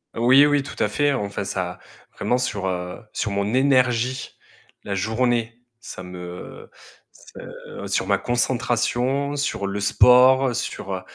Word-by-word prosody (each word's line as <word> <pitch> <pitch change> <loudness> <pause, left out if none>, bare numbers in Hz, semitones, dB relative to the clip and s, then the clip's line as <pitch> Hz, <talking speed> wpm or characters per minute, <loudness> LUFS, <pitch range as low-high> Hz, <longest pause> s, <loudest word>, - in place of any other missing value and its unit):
Oui, 130 +5 +6
oui, 145 -1 +2
tout 135 - -9
à 105 - +1
fait. 145 +5 +1
Enfin, 100 -4 -3
ça, 90 -2 -4 0.4
vraiment, 125 - 0
sur, 100 -6 -2
heu, 90 -1 -4
sur 105 - -2
mon 100 +3 -1
énergie 130 -2 +1 0.5
la 100 - -4
journée. 115 +3 -1 0.2
Ça 95 - -9
me 90 0 -9 0.4
se - - -11
sur - - -1
ma - - +3
concentration, 125 +3 0
sur 120 -8 -2
le 100 +1 -3
sport, 125 +4 +5
sur, 115 -5 -4
heu, 95 - -6
120 Hz, 140 wpm, -22 LUFS, 100-130 Hz, 0.5 s, Oui